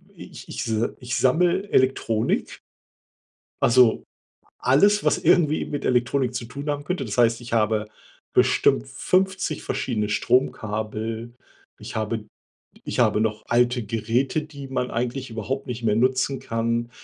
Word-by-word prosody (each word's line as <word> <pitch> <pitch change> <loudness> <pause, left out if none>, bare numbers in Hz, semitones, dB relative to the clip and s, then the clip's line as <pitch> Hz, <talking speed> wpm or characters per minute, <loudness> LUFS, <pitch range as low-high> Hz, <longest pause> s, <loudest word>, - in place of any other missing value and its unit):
i - - -11
ich - - -11
ich - - -5
s 110 - -1 0.3
ich 120 0 -3
sammel 175 +8 +2
Elektronik. 115 -4 +1 1.0
Also 120 -1 +4 0.6
alles, 200 +11 +4
was - - +3
irgendwie 155 -3 +3
mit 145 -1 -4
Elektronik 125 +1 +1
zu 120 - -3
tun 140 +5 -6
haben 145 0 -2
könnte. 155 -5 -3
Das 105 +2 -5
heißt, 115 0 +3
ich 120 -1 -8
habe 110 -1 +1 0.5
bestimmt - - +3
50 185 - 0
verschiedene 105 -4 -2
Stromkabel. 110 -1 -1 0.5
Ich - - -9
habe 110 0 -2 0.6
ich - - -3
habe - - +3
noch 110 -1 -1
alte 120 0 +2
Geräte, 115 +8 -1
die 140 -3 -10
man 125 -1 -2
eigentlich 125 +2 -3
überhaupt 130 +5 -4
nicht 120 -1 -5
mehr 105 -1 +2
nutzen 130 +2 +1
kann. 115 +1 -2
120 Hz, 140 wpm, -24 LUFS, 115-135 Hz, 1.0 s, Also